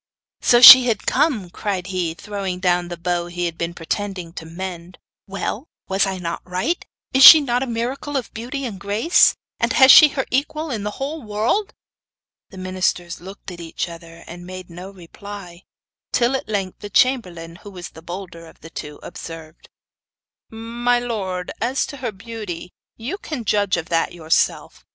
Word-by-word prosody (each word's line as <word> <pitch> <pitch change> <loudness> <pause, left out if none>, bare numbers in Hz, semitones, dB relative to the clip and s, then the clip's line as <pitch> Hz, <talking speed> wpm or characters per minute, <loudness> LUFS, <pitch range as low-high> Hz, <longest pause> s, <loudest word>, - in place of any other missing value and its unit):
'So 240 0 +4
she 255 0 +12
had 220 -4 -1
come!' 220 - 0
cried 190 -3 -3
he, 180 -3 -3
throwing 195 -2 -5
down 180 -1 +1
the 175 0 -7
bow 175 0 -2
he 175 0 -3
had 170 -1 -3
been 170 0 -3
pretending 180 0 -4
to 160 - -8
mend. 175 +1 -8 0.3
'Well, 200 +7 -4 0.2
was 195 +1 +1
I 190 -1 -3
not 170 -2 -5
right? 185 - -2 0.3
Is 265 0 +5
she 315 - +12
not 250 -4 -1
a 265 - -2
miracle 250 +5 -3
of 255 - -5
beauty 260 +5 -5
and 205 -6 -6
grace? 210 - +3 0.2
And - - 0
has 265 -1 +8
she 305 - +10
her 275 -2 -3
equal 305 +3 -1
in 220 -4 -3
the 210 - -3
whole 295 +4 -4
world?' 225 - -1 0.7
The 190 - -13
ministers 185 -2 -2
looked 190 +1 -10
at 175 - -10
each 165 0 -4
other, 170 0 -12
and 175 +1 -10
made 185 0 -9
no 180 +3 -9
reply; 190 0 -11 0.5
till 245 +2 +2
at 260 - -5
length 195 -3 -3
the 205 - -8
chamberlain, 180 -9 0
who 205 - -12
was 180 -3 -9
the 160 - -13
bolder 170 -1 -9
of - - -18
the 165 - -12
two, 150 -2 -8
observed: 165 -1 -10 0.8
'My 235 +2 -1
lord, 195 -7 -4
as 250 +4 0
to 285 - -9
her 250 -3 -4
beauty, 200 -4 -8 0.2
you 270 - -5
can 280 -11 -6
judge 205 -3 +1
of 170 0 -6
that 165 -1 +1
for - - -13
yourself. 160 -1 -1
195 Hz, 180 wpm, -21 LUFS, 175-240 Hz, 0.8 s, she